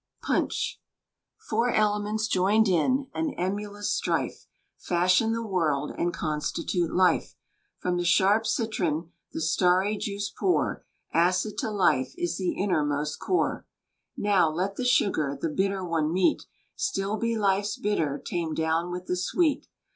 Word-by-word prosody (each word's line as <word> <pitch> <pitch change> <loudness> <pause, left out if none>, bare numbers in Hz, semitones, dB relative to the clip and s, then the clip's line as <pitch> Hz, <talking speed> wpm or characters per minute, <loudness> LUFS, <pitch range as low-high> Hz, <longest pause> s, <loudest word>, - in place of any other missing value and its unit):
PUNCH. - - -1 0.7
Four 230 +3 +1
elements, 215 0 +1
joined 210 +2 +3
in 255 - +2
An 320 -3 -2
emulous 205 +3 -2
strife, - - -2 0.3
Fashion 185 +5 +2
the 230 0 -2
world, 155 -8 0
and 175 - 0
Constitute 160 +2 -2
life. 180 -2 +2 0.4
From 180 -1 -1
the 175 - 0
sharp 205 +5 +3
citron 175 -8 -1 0.2
The - - -4
starry 185 +5 +2
juice 205 0 -3
pour; 370 -2 0 0.3
Acid 180 +5 +2
to 255 - -1
life 135 -11 +1
is 175 -1 -2
The 185 -2 0
innermost 150 -6 -1
core. 370 - -1 0.5
Now, 200 -5 +3
let 185 +5 -2
the 255 - -3
sugar 155 - +2
The 165 - -1
bitter 190 +3 -1
one 160 -3 0
meet; 190 - +1 0.3
Still 205 - -1
be 230 +1 -1
life's 200 0 +1
bitter 160 -9 -1
Tamed 165 -3 -2
down 160 +2 0
with 180 +1 -5
the 180 - -1
sweet! 295 - 0
190 Hz, 140 wpm, -27 LUFS, 170-215 Hz, 0.7 s, joined